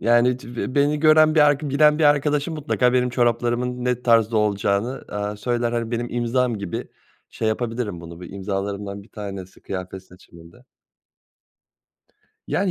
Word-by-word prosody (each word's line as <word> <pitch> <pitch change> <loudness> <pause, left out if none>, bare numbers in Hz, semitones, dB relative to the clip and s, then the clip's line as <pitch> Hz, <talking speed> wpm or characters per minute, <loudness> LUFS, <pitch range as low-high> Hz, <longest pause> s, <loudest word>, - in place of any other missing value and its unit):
Yani, 120 +3 +3
cı 120 +1 -6
beni 145 +1 +2
gören 155 0 +5
bir 155 - +5
arka 145 0 +3
bilen 150 +2 +4
bir 155 - +2
arkadaşım 145 +2 +2
mutlaka 130 -4 +1
benim 125 -1 +2
çoraplarımın 120 +1 0
ne 125 -1 -1
tarzda 115 -2 +3
olacağını, 105 +3 0
aaa, 105 0 -4
söyler. 120 +2 -1
Hani, 115 -1 -2
benim 120 0 -3
imzam 120 -1 0
gibi 100 -3 -5 0.4
şey 110 - -2
yapabilirim 115 -4 -3
bunu, 85 +1 -10
bir 90 - -9
imzalarımdan 100 +1 -4
bir 100 - -20
tanesi 100 -4 -8
kıyafet 95 0 -6
seçimimde. 85 -2 -17 1.8
Yani, 195 0 0
120 Hz, 145 wpm, -22 LUFS, 100-130 Hz, 1.8 s, gören